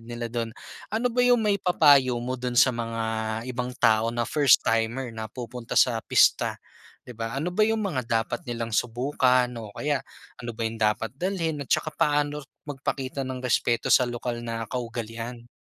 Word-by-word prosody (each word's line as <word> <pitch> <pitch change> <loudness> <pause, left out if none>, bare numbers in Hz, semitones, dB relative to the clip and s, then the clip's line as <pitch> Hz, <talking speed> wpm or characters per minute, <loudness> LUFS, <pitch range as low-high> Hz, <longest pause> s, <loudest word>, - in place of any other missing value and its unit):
nila 120 0 -6
dun, 115 -1 -2 0.4
ano 225 +3 -1
ba 245 - +1
'yung 245 0 +5
may 210 -3 +1
papayo 145 -8 +5
mo 125 +1 -4
dun 125 -1 -3
sa 130 - +6
mga 115 -1 -3 0.4
ibang 125 0 -4
tao 110 0 +3
na 120 0 -1
first 145 -1 +4
timer 115 +2 0
na 110 -1 -6
pupunta 120 -1 -7
sa 115 -3 +4
pista? - - +3 0.5
'Di 125 - -9
ba, 115 0 -4
ano 140 +6 -2
ba 185 +4 +2
'yung 220 0 +1
mga 145 - -2
dapat 115 +1 -1
nilang 115 -1 -4
subukan 125 +2 +2
o 110 -3 -8
kaya 145 0 -1 0.5
ano 120 - -4
ba 110 - -12
'yung 115 0 -4
dapat 105 0 +1
dalhin 170 -2 -1
at - - -22
tsaka - - +1
paano 145 -2 +1 0.2
magpakita 135 -1 -3
ng 130 -1 -5
respeto 120 -1 +1
sa 125 - +6
lokal 120 -1 -4
na 115 -1 -4
kaugalian? 120 0 -5
125 Hz, 175 wpm, -26 LUFS, 115-145 Hz, 0.5 s, sa